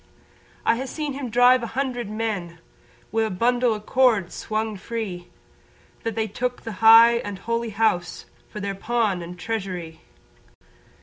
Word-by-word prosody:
I 230 +2 +2
ha' 265 - -4
seen 300 0 -4
him 270 -2 -5
drive 245 +2 +5
a 235 - -3
hundred 250 -5 -2
men 210 -6 -3 0.5
Wi' 225 +2 +1
a - - -2
bundle 240 +4 +1
o' - - -6
cords 220 -6 +2
swung 220 0 -3
free, 190 -4 -5 0.7
That 225 -2 -3
they 220 -1 0
took 245 +4 -4
the 225 - -5
high 230 +1 +8
and 205 -4 -5
holy 230 +3 -2
house 200 -5 0 0.2
For 210 - -7
their 200 -1 -3
pawn 210 -2 -1
and 175 +1 -8
treasury. 180 -6 -5
225 Hz, 150 wpm, -24 LUFS, 195-235 Hz, 0.7 s, high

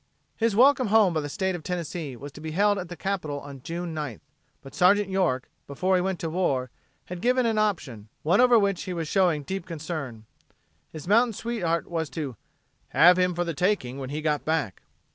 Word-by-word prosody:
His 225 -2 0
welcome 260 +1 +5
home 210 -4 +4
by 155 - 0
the 145 - -5
State 190 +5 -1
of 175 - -5
Tennessee 165 -4 -4
was 140 +4 -9
to 150 - -12
be 160 0 -5
held 205 +3 +3
at 180 -2 -6
the 175 - -6
capital 175 -7 -3
on 140 -2 -10
June 170 +2 -5
9th. 150 -8 -5 0.4
But 135 - -12
Sergeant 195 +2 +4
York, 175 -10 0 0.2
before 185 +7 0
he 180 - +2
went 190 0 -1
to 165 - -2
war, 135 -8 0 0.3
had 180 -1 -7
given 250 +1 +2
an 225 -2 +1
option 130 - -2
one 175 +9 +4
over 245 -1 +6
which 200 -3 +1
he 185 - -4
was 165 -2 -3
showing 175 -5 +2
deep 190 +4 -5
concern. 150 -9 -6 0.7
His 155 0 -9
mountain 230 +3 +4
sweetheart 190 -8 -2
was 165 -3 -3
to 140 -6 -3 0.5
"have 180 +2 +6
him 180 -1 +2
for 175 - 0
the 170 -1 -3
taking 145 -6 0
when 130 -1 -5
he 150 +2 -4
got 150 -2 0
back." 155 - -1
175 Hz, 205 wpm, -26 LUFS, 150-195 Hz, 0.7 s, over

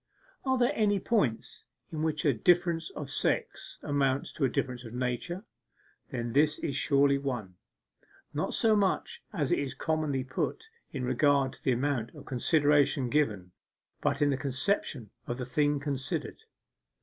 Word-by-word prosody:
Are 260 0 +3
there 245 +3 +3
any 205 -5 +2
points 165 - 0 0.3
in 155 - -3
which 155 -1 -1
a 145 - +5
difference 170 +5 +2
of 140 -2 -7
sex - - -1
amounts 140 -1 0
to 155 - -3
a - - +2
difference 125 0 -2
of 115 0 -9
nature? 125 - -2 0.7
Then 120 -3 -3
this 150 +3 +4
is 140 - -3
surely 140 -1 +3
one. 120 -9 -4 0.8
Not - - -1
so 220 -1 +4
much, 200 -2 0
as 155 -10 -1
it - - +3
is 135 -2 -3
commonly 155 -3 -1
put, 130 - -3 0.2
in 135 -3 -4
regard 135 +2 +2
to - - -14
the 130 - +3
amount 120 -2 -1
of - - -11
consideration 145 -1 +3
given, 105 -12 0 0.5
but - - +1
in 145 - +3
the 135 - 0
conception 135 - -1 0.2
of 120 - -3
the 125 - -3
thing 145 +3 +1
considered. 145 - -3
140 Hz, 160 wpm, -30 LUFS, 130-155 Hz, 0.8 s, a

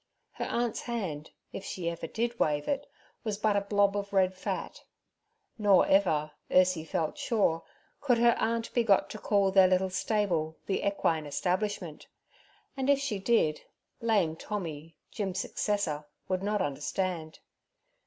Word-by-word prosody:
Her - - -4
aunt's 240 -1 -1
hand, 185 -11 -4 0.2
if 195 - -6
she 180 -3 -4
ever 170 -1 -3
did 235 +5 -2
wave 150 -1 +1
it, 285 0 -1 0.4
was 215 -3 -2
but 215 -1 +2
a 200 - +3
blob 200 0 +2
of 200 0 -3
red 190 -1 +3
fat. 185 - -5 0.8
Nor 205 -3 +5
ever, 155 -6 +2 0.2
Ursiefelt 165 -3 +2
sure, 195 -8 +1 0.4
could 255 -4 +2
her 235 0 +5
aunt 230 0 -1
be 240 - +3
got 200 -4 +3
to 215 - -7
call 200 -3 +2
their 190 -1 +7
little 185 0 +2
stable 180 -7 0
the 195 - -1
equine 165 -6 0
establishment; 180 +1 -2 0.7
and 270 0 -1
if 280 - +6
she 275 -7 -2
did, 190 -8 +2 0.4
lame 205 -9 +2
Tommy, 165 -5 -6
Jim's 190 -4 -3
successor, 180 -9 -1 0.2
would 185 -1 -1
not 205 0 0
understand. 160 +3 -3
195 Hz, 145 wpm, -30 LUFS, 165-215 Hz, 0.8 s, their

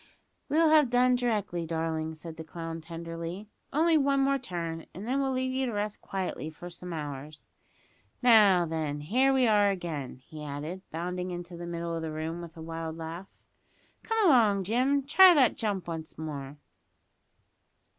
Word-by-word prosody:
"We'll 320 +1 +4
have 305 -5 +6
done 250 +1 +4
d'rectly, 210 -9 -1
darling," 160 -1 -2
said 160 +1 -9
the 160 - -6
clown 165 0 -6
tenderly; 165 +4 -7 0.2
"only 320 +2 +4
one 275 0 +2
more 275 0 +2
turn, 170 -8 -5
and 195 +5 -7
then 265 +3 +1
we'll 270 -1 0
leave 260 0 -1
you 260 0 0
to 235 - -3
rest 210 0 -3
quietly 185 -5 -4
for 175 +3 -10
some 180 +1 -8
hours. 150 -1 -6 0.7
Now, 210 -7 +6
then, 155 -3 -3
here 255 - +3
we 265 -2 +3
are 205 -2 +4
again!" 165 -8 -4
he 155 -1 -9
added, 150 +6 -5
bounding 180 +2 -3
into 175 0 -6
the 170 0 -7
middle 170 0 -3
of 165 - -3
the 160 -1 -4
room 160 +2 -4
with 170 0 -10
a 160 - -8
wild 165 0 -5
laugh. 165 +4 -6 0.7
"Come 450 -2 +1
along, 215 - +5
Jim, 255 +7 +1
try 360 +6 +7
that 260 -6 +4
jump 200 -6 -2
once 160 -2 -6
more." 145 -3 -6
175 Hz, 170 wpm, -29 LUFS, 160-245 Hz, 0.7 s, try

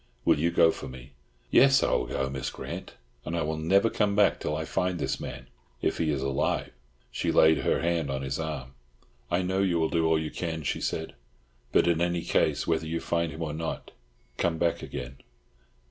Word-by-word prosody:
Will - - +4
you 85 +3 +2
go 80 -1 +5
for - - -7
me?" 65 +1 -11 0.4
"Yes. 135 +1 +6
I - - +2
will - - +1
go, 65 - -1
Miss 65 0 -3
Grant; - - -7 0.3
and 85 +2 -3
I 85 - 0
will 80 +1 -2
never 95 +7 +3
come 105 -2 +1
back 105 -1 +4
till 75 - -2
I 80 - -3
find 90 +2 -1
this 70 -3 -2
man—if 65 -1 -6
he 80 - +1
is 70 -3 0
alive." 70 0 0 0.4
She - - -1
laid 80 0 +5
her - - +1
hand 85 -3 0
on 70 0 -2
his 70 +2 -3
arm. 70 -5 -4 0.6
"I 90 +2 +1
know 95 +1 0
you 95 -3 +2
will 80 - +1
do 80 -1 +2
all 80 0 +3
you 80 -1 -3
can," 80 -3 -4
she 65 - -2
said, 80 0 -3 0.6
"but - - +4
in 85 -1 +2
any 85 -1 0
case, - - +1
whether 80 -1 0
you 85 +1 -2
find 85 -1 -1
him 80 +3 -5
or 75 -2 -3
not—come 80 0 -5
back 85 0 0
again!" 65 +2 -6
80 Hz, 205 wpm, -28 LUFS, 70-85 Hz, 0.6 s, Yes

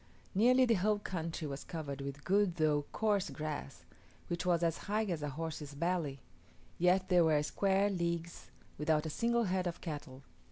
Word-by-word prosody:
Nearly 250 +6 +5
the 235 - +3
whole 210 +1 +3
country 165 -5 -4
was 140 0 -5
covered 145 -4 -5
with 140 +1 -6
good 195 -2 +2
though 150 -3 +2
coarse 205 -3 +1
grass, 150 - -5 0.4
which 175 +1 -2
was 175 -1 +3
as 165 -1 +1
high 215 +2 +2
as 175 -7 -2
a 150 - -2
horse's 150 -1 -5
belly; 160 -4 -1 0.6
yet 180 +2 +3
there 180 -2 +6
were 155 -2 +3
square 195 +5 +2
leagues 170 -2 -3 0.3
without 150 0 +2
a 160 - -2
single 235 +6 +1
head 185 -2 0
of 170 - -4
cattle. 145 -5 -7
170 Hz, 170 wpm, -34 LUFS, 150-190 Hz, 0.6 s, there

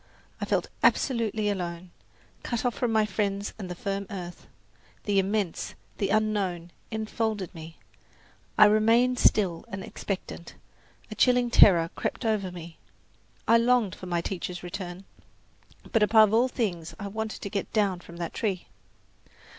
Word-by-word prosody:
I - - 0
felt - - 0
absolutely 225 -5 +2
alone, 175 -3 -3 0.5
cut 235 0 -3
off 245 - +2
from 245 0 -1
my 220 -1 +3
friends 200 0 -2
and 190 -3 -6
the 180 - -5
firm 195 +2 -3
earth. 175 -3 -8 0.6
The 205 -2 +2
immense, 195 -2 -1 0.2
the 195 - 0
unknown, 200 -5 0 0.2
enfolded 220 -3 -2
me. 160 -1 -10 0.8
I 215 - +9
remained 230 +4 +4
still 180 -6 +3
and 190 0 -6
expectant; 185 -4 -6 0.6
a - - -2
chilling 250 -1 +3
terror 170 -7 +6
crept - - -3
over 210 -4 0
me. 170 -4 -10 0.7
I 230 +1 +6
longed 235 -5 +2
for 185 - -9
my 175 -1 0
teacher's 180 0 -5
return; 180 +1 -6 0.9
but 225 - +3
above 215 0 +6
all 235 +3 +4
things 185 -10 -3
I 200 - -5
wanted 220 +2 -4
to 200 - -5
get 200 -2 -3
down 200 -5 +1
from 170 -1 -12
that 170 -1 -4
tree. 195 -6 -2
200 Hz, 145 wpm, -27 LUFS, 180-220 Hz, 0.9 s, I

